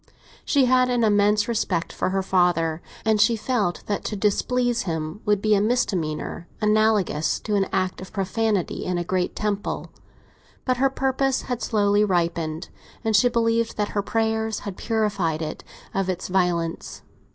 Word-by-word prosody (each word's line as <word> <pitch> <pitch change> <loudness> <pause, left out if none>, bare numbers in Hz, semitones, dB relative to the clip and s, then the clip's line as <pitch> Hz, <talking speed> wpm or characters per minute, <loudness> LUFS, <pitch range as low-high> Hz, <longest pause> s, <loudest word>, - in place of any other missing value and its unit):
She 280 -4 +3
had 255 0 +4
an 245 -1 +1
immense 210 0 +3
respect 200 -7 -1
for - - -1
her 190 0 0
father, 175 -3 +1 0.2
and 220 -2 +3
she 230 +3 +4
felt 215 -5 -1
that 205 - -2
to 210 - -2
displease 240 +4 +1
him 160 +2 -4
would 205 -1 +1
be 215 -1 +4
a 200 - +4
misdemeanour 175 -8 -1
analogous 210 -7 +2
to 215 - -3
an 195 -2 +2
act 185 -1 -1
of 185 - -9
profanity 200 0 -1
in 180 -1 -1
a 175 - -1
great 180 +1 -1
temple; 205 -1 -3 0.7
but 255 -1 +1
her 270 +2 +3
purpose 270 0 0
had 245 -2 -4
slowly 205 -1 +2
ripened, 170 -3 -1 0.3
and 220 -2 +1
she 245 +5 +5
believed 230 -1 +1
that 210 -1 0
her 205 - -1
prayers 220 0 -1
had 200 -3 -6
purified 200 -9 -1
it 155 - -6 0.3
of 195 -1 -1
its 185 0 -3
violence. 175 -3 -1
205 Hz, 165 wpm, -24 LUFS, 180-225 Hz, 0.7 s, she